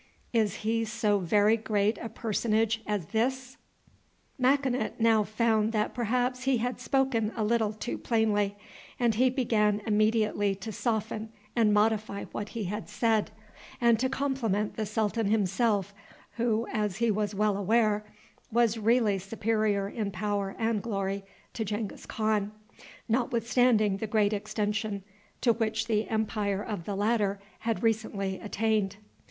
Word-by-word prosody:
Is 215 -4 +2
he 225 +1 +1
so 215 -2 +1
very 205 +4 +3
great 215 -1 0
a 230 - -5
personage 225 0 0
as 205 -5 -1
this?" 260 +3 -1 0.8
Makinut 260 -1 +1
now 225 -1 +4
found 220 0 +1
that 210 -1 0
perhaps 250 +2 -1
he 270 -2 +3
had 245 +2 -2
spoken 260 -6 +1
a 225 - -1
little 220 -1 +2
too 220 +3 -5
plainly, 210 -3 +1 0.4
and 240 -2 +3
he 255 +4 +3
began 215 -5 +1
immediately 215 -2 +2
to 200 +3 -7
soften 220 0 -2 0.3
and 225 -3 +4
modify 210 -1 +1
what 210 0 -4
he 220 - -1
had 210 +3 -4
said, 225 -3 +1 0.5
and 235 -2 +4
to 260 +2 +1
compliment 255 -7 -1
the 215 -2 -2
sultan 215 0 0
himself, 205 0 +1 0.4
who, 230 -1 +1
as 210 -4 0
he 235 0 +2
was 210 0 -1
well 210 0 +2
aware, 210 +1 +2 0.5
was 230 -1 +2
really 220 -2 +3
superior 210 0 0
in 210 0 -3
power 200 -1 -2
and 225 -2 0
glory 195 -3 -2 0.3
to 225 - -2
Genghis 210 0 -4
Khan, 215 -2 0 0.6
notwithstanding 235 -3 +2
the 220 - -3
great 210 -1 +2
extension 210 -1 -2 0.4
to 235 - +4
which 220 -1 -1
the 215 -1 0
empire 210 -2 -1
of 205 -7 -5
the 205 - -3
latter 205 -1 +1 0.2
had 230 0 -2
recently 210 -4 0
attained. 210 -2 0
220 Hz, 140 wpm, -29 LUFS, 205-230 Hz, 0.8 s, now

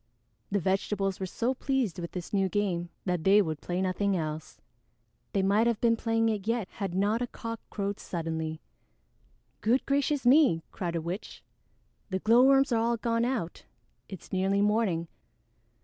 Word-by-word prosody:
The 205 - +1
vegetables 195 +1 -1
were 190 - -3
so 240 +7 -1
pleased 260 -8 -1
with 170 -1 -6
this 180 +1 -6
new 195 -1 +2
game 180 -4 -1 0.2
that 180 -4 -1
they 195 +3 +6
would 160 -6 -1
play 180 +1 -2
nothing 190 +1 0
else. 155 -1 -5 0.7
They 195 - +1
might 205 +4 +3
have 230 -2 +1
been 230 -1 +3
playing 225 0 +1
it 210 -2 -3
yet 230 -4 0
had 195 -4 -5
not 205 +5 +1
a 245 - -1
cock 230 -1 -6
crowed 200 -1 -3
suddenly. 160 -2 -4 1.0
"Good 240 +5 +2
gracious 280 0 0
me!" 255 - +5
cried 175 -4 -3
a 165 - -1
witch. 175 +5 -6 0.7
"The 190 - -1
glowworms 260 +6 +5
are 230 -1 +2
all 235 +1 +1
gone 230 +1 0
out. 235 -10 -3 0.4
It's 190 - -10
nearly 190 +1 +1
morning. 205 -5 +1
200 Hz, 165 wpm, -29 LUFS, 180-230 Hz, 1.0 s, they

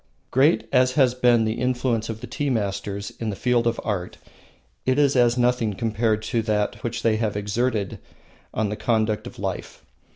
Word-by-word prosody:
Great 130 -4 +3
as 130 0 +4
has 130 -3 +4
been 120 -2 +3
the 110 +1 -2
influence 125 -3 0
of 110 0 -5
the - - -5
tea 145 -1 -2
masters 100 -3 -2
in 115 - -2
the 100 - -3
field 120 +1 +1
of 115 - 0
art, 95 -5 -3 0.7
it 130 +1 +1
is 140 -2 +3
as 120 -1 +4
nothing 120 -3 +2
compared 110 0 0
to 115 - 0
that 105 -2 -1
which 120 0 -3
they 110 -1 +3
have 110 -2 -1
exerted 105 0 -1 0.5
on 110 -1 -1
the 105 - -3
conduct 110 -1 0
of - - -11
life. - - -5
115 Hz, 185 wpm, -24 LUFS, 105-125 Hz, 0.7 s, as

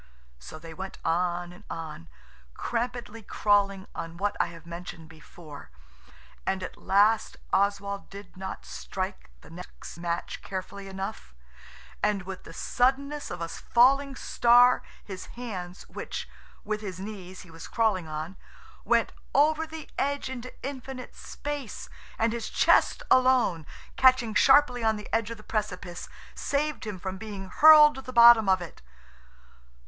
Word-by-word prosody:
So 65 - -10
they 165 +1 -10
went 190 +3 -7
on 175 +1 0
and 180 - -15
on, 155 - -7 0.5
crampedly 235 -2 -3
crawling 200 -2 +1
on 165 0 -6
what 205 +2 -1
I - - +3
have 170 -1 -12
mentioned 170 -1 -8
before, 155 - -13 0.7
and 190 -1 -1
at - - -6
last 210 +3 +2 0.2
Oswald 200 0 0
did 200 -1 -11
not 190 +1 -7
strike 60 +1 -5
the - - -15
next 180 0 -10
match 170 0 -3
carefully 195 +1 -6
enough, 190 - -6 0.7
and 210 -2 +1
with 190 0 -8
the - - -10
suddenness 275 - 0
of - - -6
a 165 - -2
falling 270 +9 +3
star 245 0 +5 0.2
his 190 -2 -8
hands, 185 -7 -6
which, - - -6 0.4
with 215 0 -3
his 190 -4 -6
knees, 190 -2 -8
he 180 - -14
was 165 0 -10
crawling 210 -7 +1
on, 155 +4 -5 0.5
went - - +2 0.2
over 310 +2 +3
the 320 -1 -8
edge 280 -1 -1
into 255 -1 -7
infinite 265 -1 -7
space, 290 -5 -6 0.3
and 225 0 +1
his 235 -2 -4
chest - - +3
alone, 250 - +4 0.3
catching 255 -4 +5
sharply 265 0 +5
on 220 -1 +3
the 210 - -8
edge 225 -1 +1
of 230 - -6
the 215 - -14
precipice, 185 -6 -4 0.2
saved 290 -3 -2
him 210 -3 -4
from 190 +1 -5
being 200 -3 -7
hurled 300 +2 +8
to 265 - -8
the 255 - -8
bottom 235 -3 +8
of 185 -1 +3
it. 170 - -11
205 Hz, 145 wpm, -27 LUFS, 180-245 Hz, 0.7 s, hurled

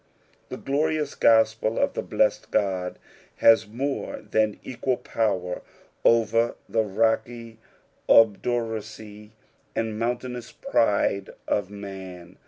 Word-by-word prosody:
The - - -6
glorious 150 +1 -1
gospel 110 0 +3
of - - +1
the - - -2
blessed - - 0
Ood 95 -3 0 0.4
has 110 -1 +5
more 135 +6 -3
than 110 -1 0
equal 130 0 -2
power 95 -5 -2 0.4
over 115 0 +3
the 115 - +1
rocky 110 +2 -1 0.5
obduracy 110 -1 +1 0.4
and 110 -1 -2
mountaiaona 120 0 -3 0.2
pride 100 -3 +2 0.2
of 100 -3 0
man. 95 -3 -9
110 Hz, 100 wpm, -25 LUFS, 100-115 Hz, 0.5 s, has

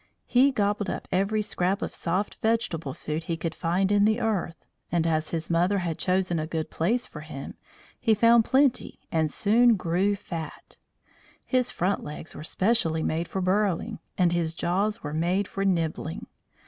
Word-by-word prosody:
He 260 +3 +4
gobbled 205 -3 0
up - - -4
every 200 +3 +1
scrap 195 +1 -1
of - - -4
soft 185 +4 -2
vegetable 200 - -1
food 155 +2 -4
he 170 -3 -2
could 165 0 -3
find 185 +3 0
in 205 0 +4
the 220 +2 +2
earth, 205 -8 -2 0.3
and 170 -2 +1
as 155 -1 0
his 165 -1 -3
mother 175 +4 +2
had 170 -4 -2
chosen 180 -2 +1
a 155 - -3
good 160 -1 -3
place 230 +10 +1
for 150 - -10
him 150 -3 -8 0.5
he 225 -2 +3
found 230 +2 +5
plenty 265 +1 +2
and 160 -3 +1
soon 230 +7 +4
grew 185 +2 +1
fat. 165 -5 -7 0.7
His 255 -2 +1
front 190 +3 -1
legs 150 +2 -7
were 150 - -8
specially 165 -3 +1
made 165 +2 -1
for 190 - -3
burrowing, 200 +2 0 0.2
and 180 -2 +3
his 165 -2 0
jaws 205 +7 0
were 150 - -4
made 180 +5 0
for 195 - -3
nibbling. 165 -4 -1
185 Hz, 175 wpm, -26 LUFS, 165-210 Hz, 0.7 s, found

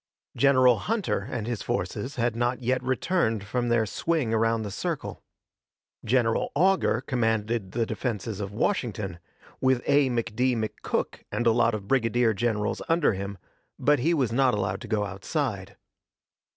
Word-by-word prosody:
General 130 -4 +5
Hunter 220 - -1
and 115 -3 -3
his 120 -3 -3
forces 135 - -3
had 120 -2 0
not 120 +2 0
yet 125 +2 +1
returned 130 - 0
from 120 +4 -2
their 120 -1 +3
swing 140 - -1
around 115 0 +2
the 105 - -5
circle. - - -4 0.8
General 115 -1 +1
Augur 190 +5 +3
commanded 110 -4 -1
the 115 -1 +1
defenses 110 -4 -3
of 100 -1 -4
Washington, 105 - -2 0.4
with 130 -1 +2
A. 145 -1 +4
McD. 120 +1 0
McCook 110 -1 -3
and 120 - -1
a 115 - +6
lot 115 0 +3
of 100 -2 -7
brigadier 120 -2 +2
generals 105 0 -1
under 165 -7 +3
him, 100 +1 -5 0.4
but 145 -1 +3
he 165 +7 +2
was 130 -7 +1
not 130 -1 +3
allowed 100 - -2
to 120 - -8
go 105 -2 0
outside. 100 - -3
120 Hz, 150 wpm, -26 LUFS, 110-130 Hz, 0.8 s, a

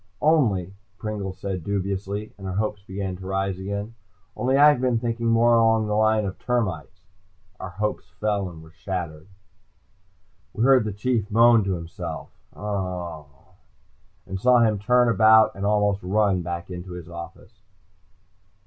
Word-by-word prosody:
"Only," 110 - +2 0.2
Pringle 105 -3 -4
said 95 -2 -5
dubiously, 100 +2 -3
and 95 -1 -8
our 95 - -4
hopes 105 0 -2
began 95 -1 -5
to 95 0 -9
arise 95 -1 -2
again. 100 +3 -4 0.4
"Only 130 +2 +1
I've 145 -2 +6
been 125 -2 +2
thinking 115 0 -2
more 115 +1 +4
along 115 -1 +4
the 105 - -2
line 110 0 +2
of 95 - -5
termites." 95 -6 -2 0.6
Our - - -6
hopes 105 +4 -3
fell 100 -3 0
and 80 -2 -12
were 80 - -16
shattered. 85 -2 -5 1.3
We 110 - -1
heard 130 -3 +5
the 105 - -2
Chief 105 +1 -1
moan 115 0 +5
to 95 -1 0
himself 85 -1 -7 0.3
and 90 -2 -8
saw 125 +3 +5
him 110 -3 +2
turn 125 +4 +3
and 110 -3 +4
almost 105 -1 +1
run 100 0 +1
back 85 +1 -5
into 90 0 -7
his 90 -2 -8
office. 85 +4 -11
100 Hz, 145 wpm, -24 LUFS, 90-110 Hz, 1.3 s, I've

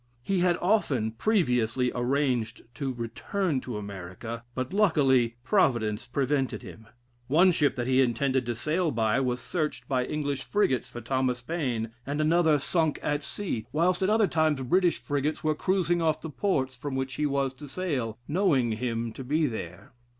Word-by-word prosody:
He 195 +4 0
had 175 -1 +3
often 145 - +2
previously 125 - +1
arranged 125 -2 0
to 135 +1 -3
return 130 - -2
to 120 -4 -5
America, 100 +3 -7
but 130 +7 -3
luckily, 135 - +3
Providence 120 - +1
prevented 135 +1 -1
him. 110 -1 -11 0.4
One 170 +7 +5
ship 145 -5 +2
that 120 - -2
he 130 +1 +3
intended 130 +2 +1
to 120 - -1
sail 160 +8 0
by, 115 -1 +1
was 125 -2 0
searched 155 +3 -3
by 130 -2 +1
English 145 -1 -2
frigates 135 -8 0
for 120 - -8
Thomas 125 0 -1
Paine, 125 -8 -2
and 140 +3 -3
another 160 0 +4
sunk 160 +2 0
at 145 0 -1
sea, 145 - -4
whilst 175 +5 +2
at 190 - +2
other 220 0 +4
times 155 -4 +1
British 175 +7 +2
frigates 145 +1 -2
were 155 0 +2
cruising 175 +1 +1
off 160 -2 +1
the 160 - -7
ports 130 -5 0
from 135 +2 -5
which 130 0 -2
he 150 +2 0
was 135 -1 0
to 145 +3 -11
sail, 135 -9 -2
knowing 150 - +2
him 115 0 -2
to 135 - -7
be 155 +5 +1
there. 90 - -6
135 Hz, 170 wpm, -27 LUFS, 120-160 Hz, 0.4 s, One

